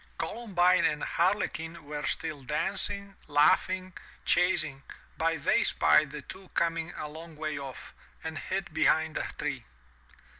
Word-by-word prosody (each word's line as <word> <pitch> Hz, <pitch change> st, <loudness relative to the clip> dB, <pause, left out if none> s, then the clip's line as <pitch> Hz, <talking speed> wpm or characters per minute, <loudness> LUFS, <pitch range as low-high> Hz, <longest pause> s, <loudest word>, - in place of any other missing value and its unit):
Columbine 185 Hz, -6 st, +2 dB
and 150 Hz, -1 st, +1 dB
Harlequin 170 Hz, -3 st, 0 dB
were 150 Hz, 0 st, -4 dB
still 150 Hz, -3 st, -2 dB
dancing, 195 Hz, +7 st, -2 dB
laughing, 185 Hz, +5 st, +3 dB, 0.3 s
chas 180 Hz, +1 st, +4 dB
ing, 135 Hz, -1 st, -7 dB, 0.3 s
but 165 Hz, -2 st, 0 dB
they -, -, +4 dB
spied 150 Hz, -1 st, +4 dB
the 145 Hz, -1 st, -7 dB
two 190 Hz, +5 st, -11 dB
coming 165 Hz, 0 st, 0 dB
a 150 Hz, -, -4 dB
long 160 Hz, +2 st, -10 dB
way 155 Hz, -1 st, -3 dB
off, 135 Hz, -2 st, -8 dB, 0.3 s
and 160 Hz, -1 st, -4 dB
hid 190 Hz, -3 st, -3 dB
behind 160 Hz, 0 st, +3 dB
a -, -, -2 dB
tree. -, -, -3 dB
165 Hz, 140 wpm, -29 LUFS, 150-185 Hz, 0.3 s, chas